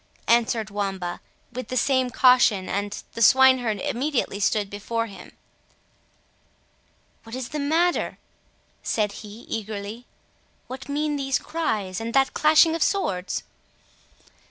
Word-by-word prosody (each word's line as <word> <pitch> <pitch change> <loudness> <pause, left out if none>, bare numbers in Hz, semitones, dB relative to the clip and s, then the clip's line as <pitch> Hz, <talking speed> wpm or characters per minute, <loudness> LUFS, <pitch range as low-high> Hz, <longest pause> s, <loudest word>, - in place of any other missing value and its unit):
answered 230 -2 +2
Wamba, 195 -3 -3 0.3
with 255 +1 -5
the 255 - -3
same 260 -1 +2
caution, 245 -6 +4
and 205 +1 -3
the 230 - -5
swineherd 255 -3 +5
immediately 275 -5 -1
stood 205 0 +1
before 220 +3 -3
him. 200 -4 -12 1.9
"What 225 +1 -9
is 255 -2 -5
the 300 - -4
matter?" 325 +5 +1 0.6
said 210 -2 0
he 215 +2 -11
eagerly; 215 +1 -6 0.6
"what 260 +3 -9
mean 295 +1 -1
these 270 -1 0
cries, 215 - -3
and 230 +2 -4
that 270 0 +3
clashing 315 +1 +5
of 330 - -3
swords?" 195 - 0
235 Hz, 120 wpm, -24 LUFS, 205-270 Hz, 1.9 s, swineherd